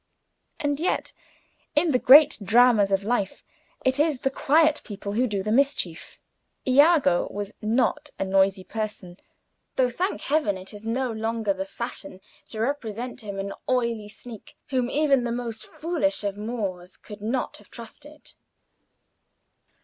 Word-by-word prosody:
And 290 Hz, -2 st, -1 dB
yet, 350 Hz, -, -1 dB, 0.6 s
in 310 Hz, +2 st, +3 dB
the 250 Hz, -, +2 dB
great 290 Hz, +3 st, +7 dB
dramas 225 Hz, -2 st, +5 dB
of 195 Hz, 0 st, +1 dB
life, 205 Hz, -3 st, -1 dB, 0.4 s
it 260 Hz, +2 st, +2 dB
is 300 Hz, -4 st, +1 dB
the 270 Hz, -, 0 dB
quiet 310 Hz, +3 st, +3 dB
people 200 Hz, -2 st, -6 dB
who 245 Hz, +5 st, +1 dB
do 200 Hz, -4 st, -2 dB
the 215 Hz, -, -2 dB
mischief. 235 Hz, -, 0 dB, 0.5 s
Iago 275 Hz, -, +4 dB
was 205 Hz, 0 st, -5 dB
not 250 Hz, +7 st, 0 dB
a -, -, -1 dB
noisy 190 Hz, 0 st, +2 dB
person, 205 Hz, -3 st, -6 dB, 0.6 s
though, 250 Hz, -1 st, +2 dB
thank 370 Hz, -, -2 dB
Heaven! 285 Hz, -10 st, +1 dB
it 185 Hz, +3 st, -9 dB
is 210 Hz, +2 st, -9 dB
no 250 Hz, +2 st, -1 dB
longer 225 Hz, -1 st, -1 dB
the 190 Hz, 0 st, -4 dB
fashion 235 Hz, -3 st, -6 dB, 0.3 s
to 220 Hz, -, -6 dB
represent 245 Hz, -1 st, -3 dB
him 200 Hz, -2 st, -6 dB
an 195 Hz, 0 st, -4 dB, 0.2 s
oily 235 Hz, -4 st, 0 dB
sneak, 220 Hz, +1 st, -12 dB
whom 255 Hz, -2 st, 0 dB
even 280 Hz, -4 st, +2 dB
the 240 Hz, -, -2 dB
most 235 Hz, -2 st, -5 dB
foolish 305 Hz, -5 st, -1 dB
of 200 Hz, -1 st, -2 dB
Moors 200 Hz, -5 st, -5 dB
could 210 Hz, -1 st, -12 dB
not 240 Hz, +4 st, -2 dB
have 205 Hz, -, -19 dB
trusted. 280 Hz, +6 st, -12 dB
230 Hz, 150 wpm, -25 LUFS, 205-270 Hz, 0.6 s, great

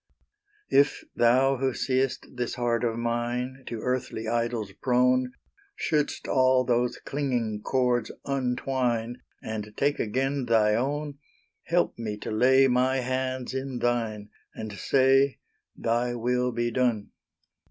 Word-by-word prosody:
If 140 Hz, +1 st, +3 dB
Thou 130 Hz, +3 st, +4 dB
who 130 Hz, -1 st, -1 dB
seest 130 Hz, 0 st, 0 dB
this 120 Hz, -1 st, -3 dB
heart 120 Hz, -2 st, 0 dB
of 115 Hz, -1 st, 0 dB
mine 120 Hz, +3 st, -2 dB
To 115 Hz, -2 st, -5 dB
earthly 125 Hz, -3 st, -2 dB
idols 115 Hz, -3 st, -1 dB
prone, 125 Hz, 0 st, +2 dB, 0.4 s
Should'st 150 Hz, -, -1 dB
all 130 Hz, -1 st, +4 dB
those 120 Hz, 0 st, +1 dB
clinging 120 Hz, -7 st, -2 dB
cords 125 Hz, -3 st, +1 dB, 0.2 s
untwine, 125 Hz, -3 st, -1 dB, 0.2 s
And 105 Hz, -1 st, -6 dB
take 145 Hz, +1 st, +1 dB
again 135 Hz, +4 st, -1 dB
Thy 110 Hz, -2 st, +3 dB
own, 140 Hz, +4 st, -2 dB, 0.5 s
Help 170 Hz, -7 st, 0 dB
me 105 Hz, -2 st, -4 dB
to -, -, -6 dB
lay 130 Hz, +4 st, +5 dB
my 130 Hz, +1 st, +2 dB
hands 130 Hz, 0 st, -2 dB
in 130 Hz, -1 st, -3 dB
thine, 115 Hz, -4 st, -1 dB, 0.3 s
And 110 Hz, -1 st, -6 dB
say 135 Hz, +5 st, +3 dB, 0.4 s
Thy 120 Hz, +1 st, 0 dB
will 125 Hz, +1 st, 0 dB
be 120 Hz, 0 st, -1 dB
done! 120 Hz, -4 st, 0 dB
125 Hz, 125 wpm, -27 LUFS, 115-130 Hz, 0.5 s, lay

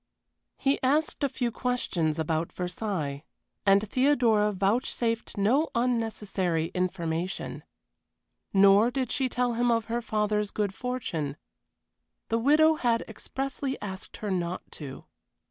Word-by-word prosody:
He 275 Hz, 0 st, +1 dB
asked 290 Hz, +3 st, +1 dB
a 280 Hz, -, +3 dB
few 245 Hz, -2 st, -2 dB
questions 185 Hz, -12 st, -1 dB
about 160 Hz, +1 st, -1 dB
Versailles, 180 Hz, -6 st, -3 dB, 0.4 s
and 200 Hz, +2 st, +5 dB
Theodora 235 Hz, -5 st, +3 dB
vouchsafed 230 Hz, +3 st, 0 dB
no 250 Hz, +11 st, +3 dB
unnecessary 210 Hz, -8 st, 0 dB
information. 180 Hz, -1 st, -2 dB, 0.9 s
Nor 200 Hz, +3 st, +6 dB
did 255 Hz, -1 st, -2 dB
she 265 Hz, -2 st, +1 dB
tell 245 Hz, -1 st, 0 dB
him 240 Hz, +1 st, +1 dB
of 230 Hz, -2 st, +2 dB
her 235 Hz, +1 st, -2 dB
father's 210 Hz, -2 st, 0 dB
good 205 Hz, -2 st, -1 dB
fortune. 175 Hz, -, -3 dB, 0.9 s
The 230 Hz, -, +1 dB
widow 305 Hz, +6 st, +5 dB
had 235 Hz, -4 st, +1 dB
expressly 270 Hz, +4 st, -4 dB
asked 190 Hz, -2 st, -7 dB
her 210 Hz, -2 st, -3 dB
not 180 Hz, -1 st, -2 dB
to. 140 Hz, -4 st, -8 dB
215 Hz, 120 wpm, -28 LUFS, 185-250 Hz, 0.9 s, Nor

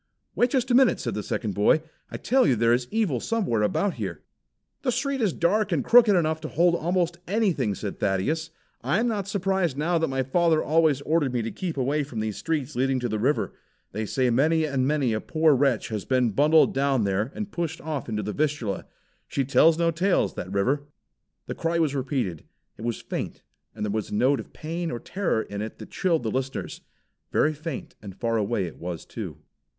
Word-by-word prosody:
"Wait 245 Hz, -, +2 dB
just 255 Hz, 0 st, 0 dB
a -, -, +4 dB
minute," 255 Hz, 0 st, +5 dB
said 120 Hz, -, -3 dB
the 105 Hz, -, -2 dB
second 105 Hz, 0 st, -3 dB
boy. 105 Hz, -, +4 dB, 0.3 s
"I -, -, -5 dB
tell 260 Hz, +2 st, +3 dB
you 130 Hz, -, +4 dB
there 115 Hz, +1 st, +3 dB
is 120 Hz, 0 st, 0 dB
evil 205 Hz, -, 0 dB
somewhere 195 Hz, -, 0 dB
about 185 Hz, -, +1 dB
here!" -, -, -5 dB, 0.6 s
"The 255 Hz, -, 0 dB
street 270 Hz, +2 st, -1 dB
is 210 Hz, -5 st, +2 dB
dark 195 Hz, +5 st, +1 dB
and 155 Hz, -6 st, 0 dB
crooked 230 Hz, -4 st, +7 dB
enough 160 Hz, -2 st, +1 dB
to 155 Hz, -, -4 dB
hold 170 Hz, +3 st, +3 dB
almost 175 Hz, 0 st, 0 dB
anything," 175 Hz, -, +1 dB
said -, -, -6 dB
Thaddeus. 150 Hz, -, 0 dB, 0.3 s
"I 195 Hz, -, +1 dB
am 240 Hz, -, +1 dB
not 205 Hz, -4 st, -2 dB
surprised 190 Hz, -6 st, 0 dB
now 165 Hz, +3 st, +1 dB
that 160 Hz, -, +1 dB
my 135 Hz, 0 st, -1 dB
father 160 Hz, +4 st, +2 dB
always 155 Hz, -3 st, +3 dB
ordered 150 Hz, -2 st, +1 dB
me 120 Hz, -2 st, -1 dB
to 115 Hz, -, -3 dB
keep 170 Hz, -5 st, -4 dB
away 140 Hz, +3 st, +1 dB
from 135 Hz, -6 st, -5 dB
these 110 Hz, -1 st, -2 dB
streets 150 Hz, -4 st, -2 dB
leading 130 Hz, +1 st, +1 dB
to 120 Hz, -, -1 dB
the 110 Hz, 0 st, -2 dB
river. 135 Hz, +7 st, 0 dB, 0.4 s
They 110 Hz, +2 st, -3 dB
say 130 Hz, +1 st, +1 dB
many 155 Hz, +6 st, +3 dB
and 135 Hz, -3 st, 0 dB
many 140 Hz, -6 st, +1 dB
a 110 Hz, -, -1 dB
poor 160 Hz, -1 st, +3 dB
wretch 135 Hz, -4 st, +1 dB
has 110 Hz, -3 st, -3 dB
been 125 Hz, -3 st, +1 dB
bundled 150 Hz, +8 st, +4 dB
down 135 Hz, -3 st, +1 dB
there 100 Hz, +5 st, 0 dB
and 210 Hz, -2 st, -5 dB
pushed 170 Hz, -1 st, -3 dB
off 150 Hz, -5 st, -4 dB
into 105 Hz, -1 st, -2 dB
the 105 Hz, +1 st, -3 dB
Vistula. 145 Hz, -10 st, -1 dB, 0.4 s
She 135 Hz, -, -1 dB
tells 160 Hz, +4 st, +5 dB
no 170 Hz, 0 st, +2 dB
tales, 180 Hz, +4 st, +1 dB
that 90 Hz, -, -6 dB
river." 135 Hz, +9 st, 0 dB, 0.6 s
The -, -, -4 dB
cry 165 Hz, +1 st, -1 dB
was 160 Hz, -4 st, +1 dB
repeated. 130 Hz, -, -2 dB, 0.3 s
It -, -, -13 dB
was 120 Hz, -1 st, -2 dB
faint, -, -, -5 dB, 0.3 s
and -, -, -3 dB
there 105 Hz, -, -2 dB
was 110 Hz, 0 st, -2 dB
a -, -, -3 dB
note 130 Hz, +6 st, +3 dB
of -, -, -9 dB
pain 165 Hz, +2 st, -4 dB
or 120 Hz, -, -3 dB
terror 175 Hz, -, -1 dB
in 100 Hz, 0 st, -6 dB
it 110 Hz, 0 st, -6 dB
that -, -, -11 dB
chilled 170 Hz, -8 st, +1 dB
the 110 Hz, -, -1 dB
listeners. 130 Hz, +2 st, -3 dB, 0.5 s
Very 155 Hz, -, +2 dB
faint 155 Hz, -2 st, -6 dB
and 100 Hz, -3 st, -9 dB
far 115 Hz, +2 st, -1 dB
away 105 Hz, -2 st, 0 dB
it 85 Hz, -, -9 dB
was 85 Hz, -1 st, -5 dB
too. -, -, -7 dB
145 Hz, 215 wpm, -25 LUFS, 115-170 Hz, 0.6 s, crooked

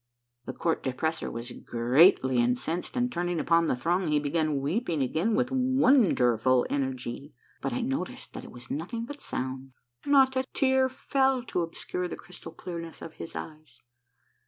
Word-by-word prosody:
The -, -, -4 dB
Court 165 Hz, -1 st, -1 dB
De 130 Hz, -, -2 dB
pressor 160 Hz, +4 st, -2 dB
was 115 Hz, +1 st, -6 dB
greatly 130 Hz, +3 st, +3 dB
incensed, 125 Hz, -, -1 dB
and 245 Hz, 0 st, +1 dB
turning 175 Hz, -4 st, -1 dB
upon 165 Hz, 0 st, +3 dB
the -, -, +1 dB
throng 170 Hz, +8 st, 0 dB
he 150 Hz, -1 st, +2 dB
began 150 Hz, 0 st, 0 dB
weeping 160 Hz, -, 0 dB
again 170 Hz, -, 0 dB
with 255 Hz, 0 st, +1 dB
wonderful 220 Hz, -, +3 dB
energy; 130 Hz, 0 st, -3 dB, 0.3 s
but 135 Hz, -, -2 dB
I 120 Hz, -, -1 dB
noticed 135 Hz, +7 st, -4 dB
that -, -, -7 dB
it -, -, -10 dB
was 120 Hz, 0 st, -10 dB
nothing 225 Hz, -, -3 dB
but 290 Hz, +3 st, -9 dB
sound: 130 Hz, 0 st, -5 dB, 0.3 s
not 270 Hz, -2 st, +5 dB
a 260 Hz, -, +2 dB
tear 265 Hz, -1 st, +3 dB
fell 265 Hz, -1 st, +1 dB
to 205 Hz, -7 st, -2 dB
obscure 180 Hz, +2 st, -3 dB
the -, -, -5 dB
crystal 180 Hz, -1 st, -10 dB
clearness 165 Hz, 0 st, -7 dB
of 160 Hz, -, -8 dB
his 165 Hz, -, -6 dB
eyes. 155 Hz, -6 st, -9 dB
165 Hz, 165 wpm, -28 LUFS, -, 0.3 s, not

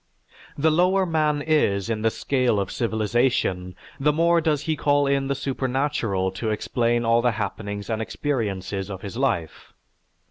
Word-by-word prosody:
The 155 Hz, +2 st, +3 dB
lower 185 Hz, +4 st, +3 dB
man 155 Hz, -3 st, +1 dB
is 120 Hz, -12 st, +1 dB
in 110 Hz, -2 st, -2 dB
the 115 Hz, -, +3 dB
scale 125 Hz, -2 st, 0 dB
of 100 Hz, -, -2 dB
civilization, 110 Hz, -5 st, 0 dB, 0.2 s
the 150 Hz, +2 st, +3 dB
more 170 Hz, +2 st, +3 dB
does 150 Hz, -3 st, 0 dB
he 160 Hz, 0 st, 0 dB
call 145 Hz, -1 st, +2 dB
in 140 Hz, 0 st, +1 dB
the 140 Hz, -, 0 dB
supernatural 130 Hz, -8 st, -1 dB
to 110 Hz, +4 st, -3 dB
explain 120 Hz, +2 st, 0 dB
all 115 Hz, +1 st, +4 dB
the 120 Hz, -1 st, +2 dB
happenings 100 Hz, 0 st, -4 dB
and 110 Hz, -1 st, -2 dB
experiences 100 Hz, -7 st, -3 dB
of 95 Hz, 0 st, -7 dB
his 100 Hz, +2 st, -6 dB
life. 110 Hz, -, -2 dB
120 Hz, 155 wpm, -24 LUFS, 105-145 Hz, 0.2 s, all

